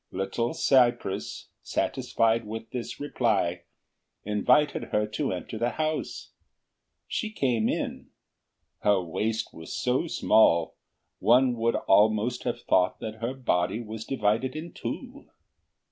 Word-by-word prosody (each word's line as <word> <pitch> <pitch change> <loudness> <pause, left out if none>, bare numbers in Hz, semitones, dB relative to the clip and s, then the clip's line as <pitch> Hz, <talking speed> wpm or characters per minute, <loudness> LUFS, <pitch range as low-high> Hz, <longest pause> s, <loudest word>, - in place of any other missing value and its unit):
Little 105 +5 -2
cypress, 120 -6 +1
satisfied 115 -3 0
with 110 +1 -7
this 125 -2 -5
reply, 100 -11 0 0.6
invited 125 +8 +2
her 105 0 0
to 105 +1 -2
enter 95 +4 -5
the 120 +1 +1
house. 155 0 -3 0.8
She 220 - -2
came 125 - 0
in; - - -3 0.7
her 105 -2 +3
waist 105 +6 -2
was 80 0 -10
so 125 +6 0
small, 85 - +3 0.5
one 125 +2 +4
would 115 0 +1
almost 110 +4 +2
have - - -2
thought 90 0 +2
that 110 0 -7
her 120 +3 -2
body 95 -5 0
was 110 -1 -6
divided 125 +1 0
in 165 +2 -6
two. - - -7
115 Hz, 120 wpm, -27 LUFS, 105-125 Hz, 0.8 s, one